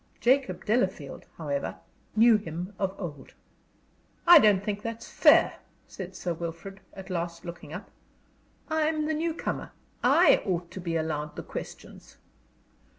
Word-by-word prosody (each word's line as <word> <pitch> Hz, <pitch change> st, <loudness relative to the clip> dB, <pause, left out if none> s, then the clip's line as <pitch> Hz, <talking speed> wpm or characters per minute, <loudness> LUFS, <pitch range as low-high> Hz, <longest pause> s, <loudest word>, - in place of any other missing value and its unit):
Jacob 260 Hz, +2 st, +1 dB
Delafield, 190 Hz, -, -1 dB
however, 145 Hz, -4 st, -3 dB, 0.4 s
knew 225 Hz, +1 st, +6 dB
him 180 Hz, 0 st, -6 dB
of 195 Hz, -1 st, -1 dB
old. 145 Hz, -8 st, -8 dB, 0.9 s
"I 345 Hz, -1 st, +10 dB
don't 205 Hz, -6 st, +4 dB
think 205 Hz, -1 st, -3 dB
that's 230 Hz, +1 st, -6 dB
fair," -, -, +5 dB, 0.3 s
said 190 Hz, -1 st, -8 dB
Sir 175 Hz, -, -3 dB
Wilfrid, 170 Hz, +4 st, -7 dB, 0.2 s
at 190 Hz, -1 st, -9 dB
last, 170 Hz, -1 st, -4 dB
looking 170 Hz, 0 st, -8 dB
up. -, -, -8 dB, 0.8 s
"I'm 315 Hz, -1 st, 0 dB
the 315 Hz, -, 0 dB
new 320 Hz, +1 st, -1 dB
comer; -, -, -4 dB, 0.3 s
I -, -, +5 dB
ought 175 Hz, -3 st, -2 dB
to -, -, -7 dB
be 170 Hz, -1 st, -3 dB
allowed 150 Hz, -2 st, -2 dB
the -, -, -6 dB
questions." -, -, -9 dB
190 Hz, 140 wpm, -28 LUFS, 170-230 Hz, 0.9 s, I